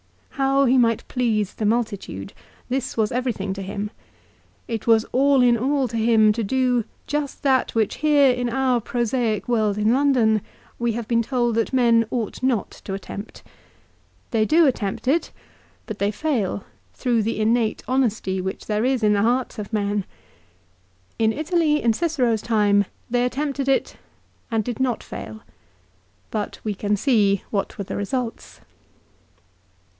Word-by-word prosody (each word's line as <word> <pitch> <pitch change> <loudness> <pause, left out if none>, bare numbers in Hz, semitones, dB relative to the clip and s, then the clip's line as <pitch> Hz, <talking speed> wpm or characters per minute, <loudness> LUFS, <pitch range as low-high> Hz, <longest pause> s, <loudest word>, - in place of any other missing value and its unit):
How 275 0 +2
he 255 +1 +4
might 230 -2 +1
please 220 -6 0
the 215 - -3
multitude; 210 - -2 0.4
this 260 -1 -2
was 215 -2 +1
everything 235 -6 -2
to 195 - -6
him. 200 +2 -4 0.8
It 225 -2 -4
was 225 -1 +5
all 275 0 +4
in 240 -1 +5
all 265 +3 +1
to 230 - -3
him 220 -1 +4
to 230 +1 -2
do 250 +1 +1 0.2
just 295 -1 -3
that 265 -4 +2
which 220 -2 +1
here 290 -3 +4
in 245 -1 -2
our 255 -1 +1
prosaic 235 -1 -1
world 215 -4 +1
in 215 +2 +3
London 250 -6 +3 0.4
we 235 -1 0
have 230 -1 -4
been 230 -1 +2
told 240 0 0
that 230 -1 0
men 235 -3 +3
ought 230 -5 -3
not 255 -6 0
to 195 - -3
attempt. 200 +2 -8 0.9
They 225 -3 +2
do 315 +8 +4
attempt 230 -3 -1
it; 320 +6 +1 0.5
but 215 -3 -7
they 200 - +1
fail, 215 -6 -1 0.3
through 240 -3 +1
the 215 0 -2
innate 225 +1 +1
honesty 225 -7 0
which 190 +1 -5
there 210 0 0
is 255 -2 +1
in 210 -1 +4
the 200 - +2
hearts 240 +1 0
of 205 +1 -6
men. 205 -2 -1 1.1
In 220 -1 +3
Italy, 310 +2 +1
in 230 -1 +3
Cicero's 250 -7 0
time, 205 -3 +3 0.3
they 245 0 +2
attempted 275 +2 -1
it 270 - 0 0.5
and 225 -2 0
did 240 -1 -5
not 255 -3 0
fail. 110 +1 -8 0.9
But 210 -2 -3
we 215 - -1
can 205 +1 -1
see 205 -6 +2
what 200 -2 -2
were 200 - -3
the - - -6
results. 230 +3 -4
230 Hz, 160 wpm, -23 LUFS, 210-260 Hz, 1.1 s, was